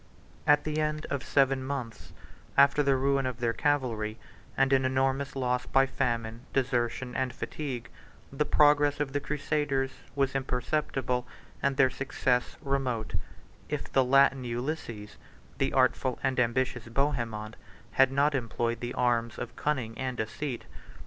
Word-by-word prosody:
At 145 0 +5
the 155 0 -1
end 155 0 -1
of 140 - -1
seven 135 -1 +2
months, 130 -5 -5 0.5
after 140 +1 +6
the 140 -2 +3
ruin 135 0 +1
of 125 -2 -4
their 115 -1 +1
cavalry, 115 -8 0 0.4
and 135 0 +3
an 135 -1 +4
enormous 135 +2 0
loss 125 -2 0
by 135 0 +4
famine, 115 -4 -2
desertion 125 -1 0
and 130 -1 0
fatigue, 130 -1 -5 0.5
the 140 - +1
progress 145 -1 +4
of 140 -2 -2
the 145 - +1
crusaders 145 -2 -1 0.2
was 135 -1 +1
imperceptible, 125 -1 -1 0.3
and 140 -1 +1
their 130 -2 +5
success 130 -2 -1
remote, 130 -5 -1 0.6
if - - -4
the 135 - +5
Latin 135 0 +4
Ulysses, 120 -3 -4 0.4
the 135 - +1
artful 130 -1 +2
and 130 -1 +1
ambitious 125 0 0
Bohemond, 115 -5 -1 0.4
had 135 0 +4
not 140 +2 +3
employed 120 -2 -1
the 120 0 -4
arms 115 -2 +1
of 120 - -6
cunning 130 -7 -1
and 130 -1 -2
deceit. 120 +4 -4
130 Hz, 140 wpm, -29 LUFS, 120-140 Hz, 0.6 s, after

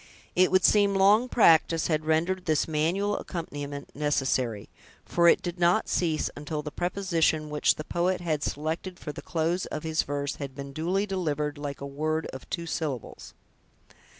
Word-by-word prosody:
It 185 +1 +5
would 185 -1 +3
seem 200 -2 +4
long 205 +6 +4
practice 165 -7 +4
had 155 -2 0
rendered 170 +4 +1
this 155 -3 +1
manual 170 +7 0
accompaniment 145 -5 -6
necessary; 135 -7 0 0.4
for 170 0 +3
it - - +5
did 175 0 -4
not 175 +5 +3
cease 160 -3 0
until 150 +1 -4
the 150 - -6
preposition 170 -4 0
which 150 - +2
the 155 - -6
poet 180 +3 0
had 155 -4 -1
selected 160 +6 -3
for 150 - -6
the - - -9
close 170 +2 -1
of - - -5
his 160 0 +1
verse 145 0 -3
had 140 -2 -6
been 140 0 -7
duly 180 +7 0
delivered 150 -7 -2
like 145 -1 -5
a - - -4
word 155 +3 -2
of 130 - -10
two 170 -1 -3
syllables. 150 -7 -5
160 Hz, 170 wpm, -27 LUFS, 145-180 Hz, 0.4 s, It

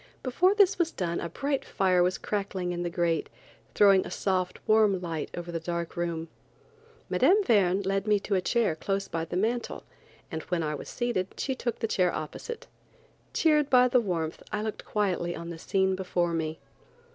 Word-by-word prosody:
Before 360 +10 +3
this 400 -3 +4
was 340 -1 +2
done 170 - -2
a 170 - -4
bright 275 - -2
fire 185 -2 +2
was 180 +1 +2
crackling 195 -3 -2
in 175 0 -3
the 175 - -1
grate, 170 -2 0 0.5
throwing 195 -2 +6
a - - -7
soft, 185 -2 -1
warm 215 -3 +4
light 165 -3 -4
over 175 0 -5
the 165 - -2
dark 170 0 -4
room. 170 -1 -2 0.8
Mme. 410 +3 +4
Verne 200 - +3
led 195 +1 -1
me 210 -1 +4
to 205 - -3
a 185 - +3
chair 220 -4 +1
close 195 +4 -2
by 165 0 -3
the 175 - -4
mantel, 230 +5 -1 0.5
and 160 -1 -3
when 175 -2 -1
I 150 -1 -1
was 150 - -7
seated 240 -7 -1
she 270 - -1
took 240 -3 -3
the 225 - -1
chair 180 -4 +2
opposite. 465 - -6 0.7
Cheered 300 -3 +3
by 250 -2 +6
the 250 0 +3
warmth 165 -6 -2
I 210 0 -1
looked 215 -1 -5
quietly 185 -4 -1
on 170 +1 -6
the 165 - -8
scene 190 +2 +1
before 180 -2 -1
me. 160 -1 -2
190 Hz, 190 wpm, -28 LUFS, 170-220 Hz, 0.8 s, throwing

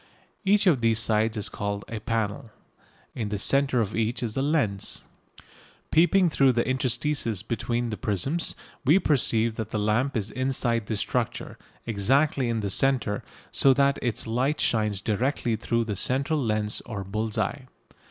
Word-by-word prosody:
Each 200 +1 +3
of 155 -10 +4
these 115 -1 +3
sides 110 0 +1
is 105 - 0
called 100 0 -4
a 115 - -5
"panel." 115 +2 -2 0.6
In 110 -4 -3
the 105 - -2
centre 135 +3 +2
of 110 -2 -3
each 115 +3 -1
is 110 -2 -3
a 135 - 0
lens. 135 -10 -1 0.9
Peeping 175 +3 +4
through 135 -5 +3
the 120 0 0
interstices 130 -4 0
between 120 +1 -2
the 105 - -4
prisms, 135 - -1 0.3
we 150 +6 +5
perceive 115 - +2
that 110 -2 -4
the 110 - -2
lamp 110 +6 +1
is 105 -1 -3
inside 125 -4 -1
this 105 -3 -2
structure, - - -3 0.3
exactly 130 +5 +1
in 115 -1 -1
the 100 -2 -2
centre, 125 -4 +1 0.3
so 135 -1 +4
that 140 0 +2
its 120 -4 -1
light 130 +6 0
shines 105 -3 0
directly 120 +1 0
through 115 +1 -1
the 105 -2 -3
central 140 - 0
lens 105 -2 -1
or 105 -4 -5
bull's 110 +3 -3
eye. 135 -2 -2
115 Hz, 160 wpm, -26 LUFS, 110-135 Hz, 0.9 s, we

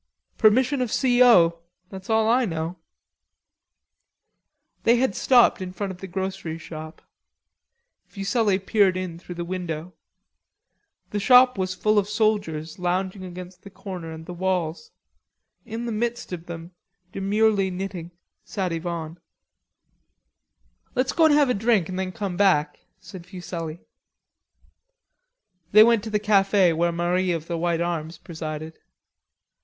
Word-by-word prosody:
"Permission 255 +5 +3
of 245 -3 -2
C. 250 -2 +2
O., 170 -9 +5 0.3
that's 190 +1 -10
all 220 0 +3
I 245 +3 +3
know 165 -7 -2
of." 175 - -11 2.1
They 235 - +4
had 245 -4 +1
stopped 245 -6 +4
in 185 -1 -5
front 190 +2 -4
of 180 - -10
the 195 - -7
grocery 190 -3 -4
shop. 155 -1 -10 1.0
Fuselli 200 0 0
peered 195 -1 +2
in 180 -3 -5
through 175 0 -9
the 175 0 -4
window. 175 -1 -5 1.2
The 210 - -1
shop 250 +4 +6
was 185 -2 -2
full 215 +3 +2
of 200 0 -3
soldiers 205 -8 -1
lounging 185 +2 -2
against 180 0 -9
the 200 - -12
counter 185 -4 -8
and 160 0 -9
the 180 - -7
walls. 175 -2 -2 0.8
In 230 +1 -5
the 235 - -3
midst 235 -1 -3
of 170 -1 -7
them, 170 0 -8 0.4
demurely 200 0 +1
knitting, 185 -2 -5 0.3
sat 190 -4 -3
Yvonne. 165 0 -5 1.8
"Let's 255 +1 0
go 325 - +4
and 310 - +5
have 290 -3 +4
a - - +2
drink 210 -5 +1
an' 185 - -4
then 190 -1 -2
come 195 -2 -4
back," 170 -6 +2 0.2
said 185 -1 -12
Fuselli. 175 -3 -6 1.9
They 215 +1 +10
went 230 -2 +3
to - - -4
the 210 - +1
cafe 195 -3 +3
where 170 +2 +1
Marie 175 +2 0
of 165 -2 -4
the 170 - -3
white 170 0 0
arms 165 -1 -3
presided. 160 -1 -7
185 Hz, 140 wpm, -24 LUFS, 170-215 Hz, 2.1 s, They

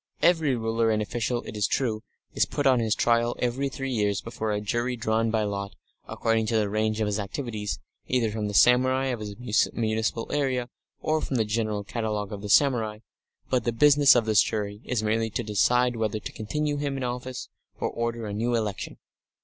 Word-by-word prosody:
Every 160 -6 +4
ruler 115 0 0
and 110 -1 +2
official, 120 +3 -2
it - - -8
is 105 -1 +1
true, 110 -5 -1 0.3
is - - +2
put 145 - -2
on 130 -2 +5
his 110 -2 +1
trial 120 0 +2
every 130 +3 -1
three 135 0 -4
years 105 -3 +1
before 110 -2 -4
a 105 - 0
jury 120 +4 -1
drawn 115 0 0
by 110 -1 +1
lot, 100 -1 -4 0.3
according 115 -1 0
to 115 - 0
the 105 -2 0
range 110 0 0
of - - +2
his 105 0 -1
activities, 105 0 -4 0.3
either 120 -4 +1
from 105 -1 -2
the 105 - -4
samurai 130 +3 +4
of 120 -3 -2
his 105 -1 -6 0.4
municipal 110 0 -1
area 130 -4 0 0.3
or 155 0 +1
from 135 - -3
the 115 -3 +2
general 105 -1 -1
catalogue 105 -2 -3
of 100 - -6
the 105 - -6
samurai, 115 -5 +3 0.5
but 125 -3 +2
the 120 - 0
business 145 +3 +6
of 120 -2 +3
this 110 -3 +5
jury 105 0 -3
is 120 -3 -1
merely 110 +1 +1
to 120 +3 -3
decide 120 +4 +2
whether 110 -1 -1
to - - -7
continue 145 +7 -2
him 140 -1 -2
in 135 - -3
office 125 +1 -4 0.3
or - - 0
order 115 -1 -3
a 105 - -4
new 120 +3 0
election. 105 -4 -3
115 Hz, 200 wpm, -26 LUFS, 105-125 Hz, 0.5 s, business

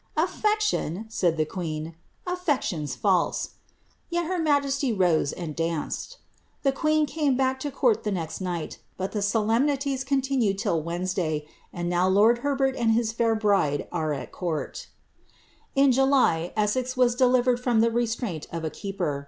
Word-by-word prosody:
^ 315 - +4
Affection 420 - 0
P - - -17
said 175 -7 +1
the 155 - +2
queen; 160 -1 -5 0.3
^aflection's 285 - -1
false;' 190 -4 +1 0.6
yet 345 -1 -1
her 365 +2 -1
majesty 280 -4 +1
rose 175 -8 +2
and 160 -4 -6
danced. 165 - -3 0.5
The 275 - +4
queen 310 +2 +2
came 295 -4 0
back 265 0 +1
to 290 - -3
court 255 -5 +1
the 210 - -1
next 165 -2 -4
night; 175 -3 -4 0.2
but 190 +1 -3
the 210 - -2
solemnities 260 +6 +1
continued 265 -7 +1
till 170 -4 0
Wed 170 +3 -4
nesday; 170 -5 -1 0.3
and 175 0 -4
now 175 +1 +2
lord 215 +5 +4
Herbert 270 -1 0
and 230 -3 +2
his 225 -1 +1
fair 230 0 +1
bride 200 -9 +1
are 160 -3 -1
at 135 -4 -5
court'' 170 -4 -4 0.5
' - - -33
In 275 0 +5
July^ 255 -11 +3
Essex 255 +5 0
was 250 -1 +4
delivered 250 -1 +3
from 245 -2 +1
the 230 0 +3
restraint 225 -8 -2
of 165 -1 -4
a 155 - -2
keeper. 180 -8 -3
225 Hz, 165 wpm, -26 LUFS, 175-270 Hz, 0.6 s, In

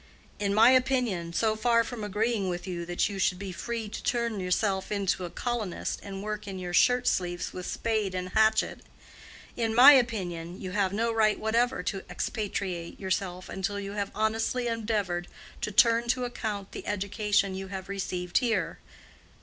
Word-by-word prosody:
In 200 -1 0
my 225 +4 +7
opinion, 250 -10 +1
so 215 +5 +1
far 230 +1 +3
from 230 -1 -6
agreeing 210 0 0
with 175 0 -4
you 175 -2 -4
that 175 0 +1
you 200 -2 -5
should 185 -1 +2
be 195 0 -6
free 230 +5 -4
to 205 - -6
turn 235 -4 -1
yourself 190 +2 0
into 195 -3 0
a - - -5
colonist 230 -3 -3
and 195 -1 -7
work 210 0 -4
in 195 -1 -5
your 180 -1 -5
shirt 250 +6 +4
sleeves 175 -1 -1
with 180 -1 -6
spade 215 -4 -1
and 185 0 -3
hatchet—in 220 +1 -1
my 260 +4 +11
opinion 185 - +1
you 185 - -5
have 195 -1 +1
no 230 +3 0
right 220 -2 +2
whatever 230 -1 +1
to 195 +1 -3
expatriate 190 -6 -3
yourself 185 -1 -2
until 200 +2 -3
you 200 0 -5
have 200 -1 -2
honestly 225 +3 0
endeavored 210 -6 -1 0.3
to - - -2
turn 230 +2 +4
to 250 +1 +1
account 215 -5 -4
the - - -8
education 205 0 0
you 190 0 -5
have 190 0 -6
received 180 -2 -1
here. 240 -3 -1
205 Hz, 170 wpm, -28 LUFS, 185-230 Hz, 0.3 s, my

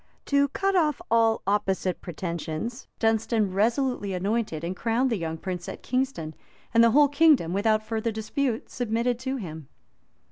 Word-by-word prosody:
To 280 0 +3
cut 390 +7 -1
off 310 -4 +2
all 225 -1 +3
opposite 190 -2 0
pretensions, 170 - -5
Dunstan 225 -2 +1
resolutely 220 0 0
anointed 195 -3 -1
and 175 +2 -3
crowned 235 +5 0
the - - +2
young 165 -4 -3
prince 180 +1 -5
at - - -8
Kingston; 255 - -2 0.4
and 230 0 +6
the 230 - +6
whole 290 +5 +6
kingdom, 285 - +4
without 215 +2 +2
further 225 +1 -2
dispute, 225 +3 -2
submitted 235 0 -1
to 260 +1 -3
him. 160 - -7
225 Hz, 150 wpm, -26 LUFS, 185-255 Hz, 0.4 s, and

